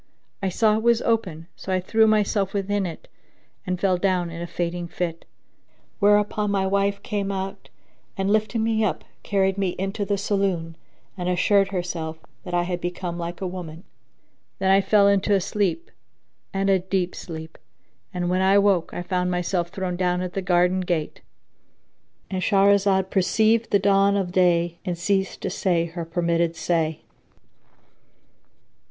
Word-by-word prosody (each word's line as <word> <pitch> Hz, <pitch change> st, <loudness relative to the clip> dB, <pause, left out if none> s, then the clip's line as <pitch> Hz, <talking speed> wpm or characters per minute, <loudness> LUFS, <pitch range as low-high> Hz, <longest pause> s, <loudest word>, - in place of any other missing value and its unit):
I 195 Hz, -, 0 dB
saw 215 Hz, +3 st, +2 dB
it -, -, -2 dB
was 235 Hz, 0 st, +3 dB
open, 185 Hz, -9 st, -1 dB
so 190 Hz, -, -6 dB
I 185 Hz, -, +2 dB
threw 220 Hz, +4 st, +3 dB
myself 205 Hz, -2 st, +1 dB
within 200 Hz, -1 st, 0 dB
it 165 Hz, -, -9 dB, 0.6 s
and 180 Hz, -1 st, -1 dB
fell 185 Hz, -1 st, +2 dB
down 180 Hz, -2 st, 0 dB
in 165 Hz, 0 st, -7 dB
a 170 Hz, -, -4 dB
fainting 175 Hz, 0 st, -3 dB
fit; 170 Hz, -1 st, -4 dB, 0.7 s
whereupon 210 Hz, 0 st, +3 dB
my 195 Hz, -1 st, +1 dB
wife 200 Hz, +1 st, 0 dB
came 200 Hz, -1 st, -2 dB
out 190 Hz, 0 st, -5 dB, 0.5 s
and 195 Hz, +1 st, 0 dB
lifting 215 Hz, +1 st, +1 dB
me 220 Hz, -1 st, +1 dB
up, 215 Hz, -, -1 dB, 0.2 s
carried 195 Hz, -1 st, 0 dB
me 190 Hz, -3 st, 0 dB
into 195 Hz, +3 st, -2 dB
the 200 Hz, 0 st, -1 dB
saloon 190 Hz, -5 st, -1 dB, 0.4 s
and 180 Hz, -2 st, -3 dB
assured 195 Hz, +2 st, +3 dB
herself 175 Hz, -4 st, -4 dB, 0.3 s
that 180 Hz, -3 st, -7 dB
I 175 Hz, -, +2 dB
had 175 Hz, 0 st, -3 dB
become 175 Hz, 0 st, -4 dB
like 170 Hz, +1 st, -5 dB
a 190 Hz, -, -1 dB
woman. 175 Hz, -2 st, -7 dB, 0.7 s
Then 190 Hz, 0 st, +2 dB
I 195 Hz, +1 st, +5 dB
fell 200 Hz, +1 st, +4 dB
into 200 Hz, +1 st, +3 dB
a -, -, +3 dB
sleep 200 Hz, -, -2 dB, 0.6 s
and 195 Hz, 0 st, -1 dB
a 195 Hz, -1 st, +4 dB
deep 185 Hz, -1 st, -1 dB
sleep; 160 Hz, -1 st, -8 dB, 0.5 s
and 175 Hz, -1 st, -2 dB
when 185 Hz, +1 st, +1 dB
I 190 Hz, +1 st, +4 dB
awoke, 200 Hz, -4 st, +2 dB
I 175 Hz, -, -3 dB
found 180 Hz, 0 st, -1 dB
myself 180 Hz, -1 st, -1 dB
thrown 180 Hz, -1 st, -4 dB
down 180 Hz, 0 st, 0 dB
at 180 Hz, 0 st, -5 dB
the 195 Hz, -, -2 dB
garden 180 Hz, 0 st, +2 dB
gate,—And 180 Hz, +2 st, -7 dB
Shahrazad 195 Hz, -1 st, +3 dB
perceived 220 Hz, +4 st, +2 dB
the 200 Hz, -, +4 dB
dawn 200 Hz, 0 st, +3 dB
of 185 Hz, -3 st, -2 dB
day 175 Hz, -2 st, +2 dB
and 180 Hz, -3 st, -3 dB
ceased 190 Hz, +2 st, -1 dB
to -, -, -3 dB
say 170 Hz, -3 st, +1 dB
her 170 Hz, 0 st, -6 dB
permitted 170 Hz, 0 st, 0 dB
say. 160 Hz, -1 st, -1 dB
190 Hz, 160 wpm, -24 LUFS, 175-200 Hz, 0.7 s, I